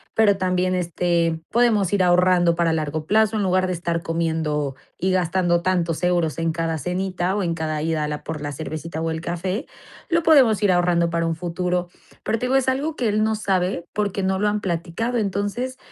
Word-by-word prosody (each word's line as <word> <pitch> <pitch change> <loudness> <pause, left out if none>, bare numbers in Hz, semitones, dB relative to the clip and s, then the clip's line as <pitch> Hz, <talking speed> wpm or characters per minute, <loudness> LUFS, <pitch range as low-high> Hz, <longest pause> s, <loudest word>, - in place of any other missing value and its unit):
pero 205 -3 +4
también, 185 -1 0
este, 170 -2 0
podemos 220 -6 +2
ir 195 -2 +3
ahorrando 180 -1 +4
para 170 -1 +1
largo 155 -1 -2
plazo 220 +3 +3
en 205 - 0
lugar 185 0 +2
de 185 - -1
estar 170 -1 -2
comiendo 160 -4 -1 0.2
y 190 +2 0
gastando 175 -1 +1
tantos 170 -2 0
euros 175 -3 +1
en 165 0 0
cada 165 0 -2
cenita 180 +2 -2
o 205 - 0
en 170 -2 0
cada 155 -2 -2
ida 160 -1 -1
a - - -1
la 150 0 -5
por 160 -2 -5
la 145 0 -4
cervecita 160 +2 -5
o 165 0 -1
el 160 0 -4
café, 185 - -3 0.4
lo 335 -1 +2
podemos 260 - +5
ir 200 - +4
ahorrando 175 -1 +2
para 170 0 0
un 165 - -1
futuro". 180 +1 -2 0.3
Pero, 225 - -1
te 250 - -2
digo, 260 - +1
es 265 -1 +3
algo 290 +4 -1
que 245 - -1
él 210 +1 +1
no 220 0 +1
sabe, 190 -4 -1
porque 200 -2 -1
no 190 0 0
lo 210 - +2
han 210 0 -1
platicado. 185 +6 -2
Entonces, 215 +5 -2
180 Hz, 205 wpm, -22 LUFS, 165-200 Hz, 0.4 s, podemos